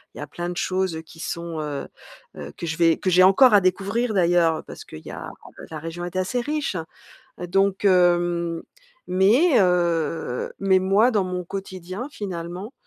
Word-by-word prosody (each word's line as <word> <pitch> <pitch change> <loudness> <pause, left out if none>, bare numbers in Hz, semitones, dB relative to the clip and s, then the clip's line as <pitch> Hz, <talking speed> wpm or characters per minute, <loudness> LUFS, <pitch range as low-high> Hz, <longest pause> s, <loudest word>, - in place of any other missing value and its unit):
il - - -11
y - - -7
a - - -4
plein 175 +4 -6
de 175 - -6
choses, 185 -2 -1
heu, 160 - -5
qui 165 +1 -16
sont 170 -1 -5
heu 145 -2 -5 0.5
heu, - - -8
que - - -5
je 165 0 -3
vais 165 -2 +4
que 185 - -1
j'ai 180 - +5
encore 195 +7 +6
à 205 - +7
découvrir 200 +5 0
d'ailleurs 170 -3 +2
parce - - -10
qu'il 80 0 -12
y - - -7
a - - -7 0.4
la 160 - -6
région 165 +2 -6
est 175 +1 -6
assez 185 +7 -1
riche. 295 -3 -2 0.7
Heu, 180 - -4
donc 195 +2 +1
hem, 175 -2 +2 0.5
mais, 235 - +4
heu, 165 -7 0
mais 195 -1 +4
moi 195 +6 +3
dans 205 -5 +1
mon 180 0 -3
quotidien 190 +4 -6
finalement, 185 +2 -6
180 Hz, 185 wpm, -23 LUFS, 170-195 Hz, 0.7 s, à